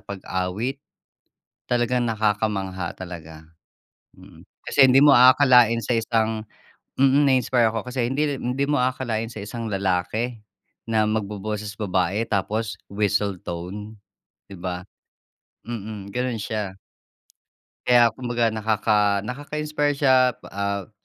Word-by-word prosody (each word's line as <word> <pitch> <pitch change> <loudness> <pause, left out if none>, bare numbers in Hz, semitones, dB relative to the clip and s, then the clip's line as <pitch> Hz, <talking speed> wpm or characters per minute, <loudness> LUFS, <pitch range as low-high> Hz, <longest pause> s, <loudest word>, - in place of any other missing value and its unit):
pag-awit. 100 +6 -3 0.9
Talagang 120 0 +1
nakakamangha 105 -5 -1
talaga, 80 -3 -9 0.7
mm. - - -16 0.2
Kasi 135 -2 +5
hindi 130 - +5
mo 145 -2 +8
aakalain 125 -2 +6
sa - - 0
isang 110 -1 0 0.6
mm, 135 +2 +4
na-inspire 125 -3 +3
ako 115 +3 -4
kasi 125 -2 -1
hindi 145 +2 0
rin 125 +1 -3
hindi 140 - 0
mo 145 - +2
aakalain 120 -3 -1
sa 105 - -7
isang 115 +2 -6
lalaki 100 +4 -1 0.5
na 110 -1 +2
magboboses 105 0 -3
babae 95 0 0
tapos 105 +2 -1
whistle 100 -1 0
tone, 100 +5 -7 0.5
di 100 - -10
ba? 90 0 -5 0.8
Mm, 105 -3 -6
ganun 125 -2 -1
siya. 105 -3 -4 1.1
Kaya 120 -2 +6
kumbaga 120 -1 -1
nakaka 105 -2 +1
nakaka-inspire 145 +5 -2
siya. 130 -3 +4 0.2
Ah, 100 0 -3
110 Hz, 115 wpm, -23 LUFS, 100-125 Hz, 1.1 s, mo